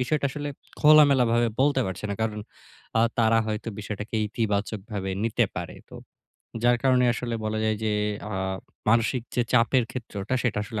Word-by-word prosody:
বিষয়টা 140 +3 +1
আসলে 145 0 -5 0.3
খোলামেলাভাবে 135 -6 +5
বলতে 140 -1 +3
পারছি 95 +2 -5
না। - - -1
কারণ 105 -1 -2 0.6
আ - - +5 0.2
তারা 115 0 +4
হয়তো 110 +1 -3
বিষয়টাকে 105 +1 -5
ইতিবাচকভাবে 100 -2 -2
নিতে 115 - +2
পারে। - - -5 0.2
তো - - -12 0.7
যার 120 0 +4
কারণে 130 -2 +4
আসলে 120 -1 -3
বলা 110 0 -1
যায় 110 0 +1
যে 105 - +1 0.4
আ - - -4 0.6
মানসিক 115 +2 +2
যে 120 - +2
চাপের 125 +1 +4
ক্ষেত্রটা 110 -2 -4
সেটা 120 -4 0
আসলে 105 0 -5
115 Hz, 155 wpm, -26 LUFS, 105-125 Hz, 0.7 s, খোলামেলাভাবে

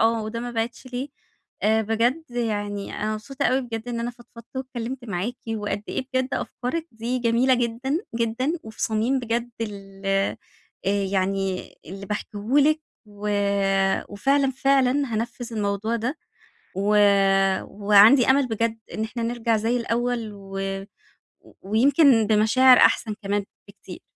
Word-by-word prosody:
آه، 225 0 +2
وده 220 +2 -4
ما 245 0 -4
بِعِدش 235 +2 -3
ليه 255 +3 -4 0.6
بجد 225 +7 +2
يعني 205 -4 -3
أنا 215 +1 -1
مبسوطة 255 +6 -5
أوي 260 +1 +2
بجد 230 -1 -6
إن 235 -1 -3
أنا 240 +1 -2
فضفَضّت 240 +1 -15
واتكلِّمت 255 -1 -5
معاكِ 205 +4 -3 0.2
وقد 205 -1 -3
إيه 260 - -3
بجدّ 260 0 +1
أفكارِِك 315 +7 -4
دي 235 +3 -2
جميلة 240 +2 +3
جدًا، 245 +5 -1 0.2
جدًا 235 +5 0
وفي 220 0 -8
صميم 230 +4 +1
بجد 235 0 -2
ال 195 -2 -2 0.5
يعني 195 -1 -1
اللي 195 +3 -8
باحكيه 210 0 -5 0.2
لكِ 305 +2 +4 0.3
و 205 0 -6 0.8
وفعلًا، 275 +6 +2
فعلًا 270 -1 +3 0.2
هانفِّذ 235 +2 -4
الموضوع 210 +2 -1
ده 250 +8 -3 0.6
و 205 +2 +1 0.7
وعندي 210 +6 +5
أمل 270 -1 +4
بجدّ 230 0 -1 0.2
إن 220 - -2
إحنا 230 +1 -4
نِرّجَع 230 -1 0
زي 230 +3 0
الأول 235 -1 -1
و 195 -1 -8 1.0
ويمكن 235 - +4
بمشاعر 225 +4 +6
أحسن 215 -2 +3
كمان 200 0 -1 0.2
بكتير. 195 -2 -12
230 Hz, 130 wpm, -24 LUFS, 210-250 Hz, 1.0 s, بمشاعر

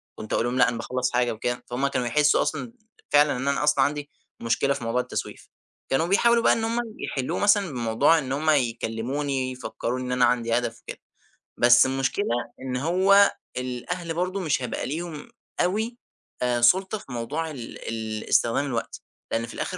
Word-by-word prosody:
كنت 110 - -6
أقول - - +1
لهم 120 +1 -1
لأ 125 - +5
أنا 120 - -4
باخلّص 125 +2 -2
حاجة 120 -1 +2
وكده، 120 +3 -3
فهمّ 125 +3 -1
كانوا 125 -3 -1
يحسوا 150 +5 +3
أصلًا 130 -6 -3 0.4
فعلًا 145 -2 +4
إن 130 +2 -3
أنا 140 +1 +1
أصلًا 150 -2 +4
عندي 145 0 -3 0.3
مشكلة 115 +4 +1
في 120 - -6
موضوع 115 +2 0
التسويف، - - -6 0.4
كانوا 135 +5 +1
بيحاولوا 235 +5 +4
بقى - - +5
إن 225 - -1
همّ 230 +1 0 0.2
يحلوه 130 -2 -3
مثلًا 205 -3 +3
بموضوع 120 +6 +3
إن 135 -3 -5
همّ 150 +3 0
يكلموني، 130 +1 -1
يفكروني 125 0 -4
إن 125 - -4
أنا 125 0 +4
عندي 120 -1 +1
هدف 120 -1 -3
وكده، - - -9 0.6
بس 120 +1 +6
المشكلة 135 +9 -1 0.4
إن 130 -1 -3
هو 190 +7 +4 0.3
الأهل 130 +8 -4
برضو 180 +3 -2
مش 155 -8 0
هيبقى 125 - -3
ليهم 160 - -5 0.3
أوي 220 +7 -1 0.4
آآ 125 -1 +1
سُلطة 190 - +4
في 165 - -13
موضوع 145 +7 -3
ال 125 -6 -8
ال 110 -1 -4
استخدام 120 +4 +2
الوقت، 120 -5 -4 0.3
لأن 115 0 0
في 115 - -10
الآخر. 185 - -4
130 Hz, 180 wpm, -25 LUFS, 120-160 Hz, 0.6 s, بس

